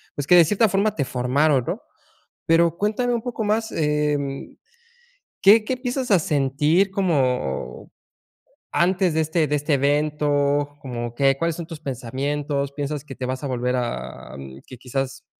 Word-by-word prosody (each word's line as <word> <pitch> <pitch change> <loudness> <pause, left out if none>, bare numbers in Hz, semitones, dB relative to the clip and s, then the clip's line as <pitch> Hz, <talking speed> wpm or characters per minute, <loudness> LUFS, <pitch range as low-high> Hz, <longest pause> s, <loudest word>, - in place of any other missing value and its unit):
pues 145 - -4
que 180 - +5
de 175 - +8
cierta 210 +6 +2
forma 200 +2 +1
te 140 -9 -1
formaron, 130 +2 +1
¿no? - - -3 0.7
Pero 165 0 +4
cuéntame 220 +6 0
un 235 - -1
poco 235 -2 -4
más, 220 +2 0
em, 150 -2 -1 0.8
¿qué 210 +3 +7
qué 260 - -1
empiezas 255 0 -3
a 195 - +6
sentir 150 +6 +1
como 130 - -1 0.8
antes 180 0 +2
de 160 - +2
este 160 0 +1
de 150 - -1
este 145 +1 0
evento? 145 0 +1
Como 120 -3 -5
que, 135 +1 +3
¿cuáles 165 +1 -1
son 170 - -6
tus 160 -2 -8
pensamientos? 140 +2 -3
¿Piensas 145 0 -4
que 140 - -9
te 130 - -5
vas 130 +2 -4
a - - -1
volver 125 -1 -1
a 65 - -5 0.3
que 130 - -11
quizás, 135 +2 -4
145 Hz, 160 wpm, -23 LUFS, 135-175 Hz, 0.8 s, de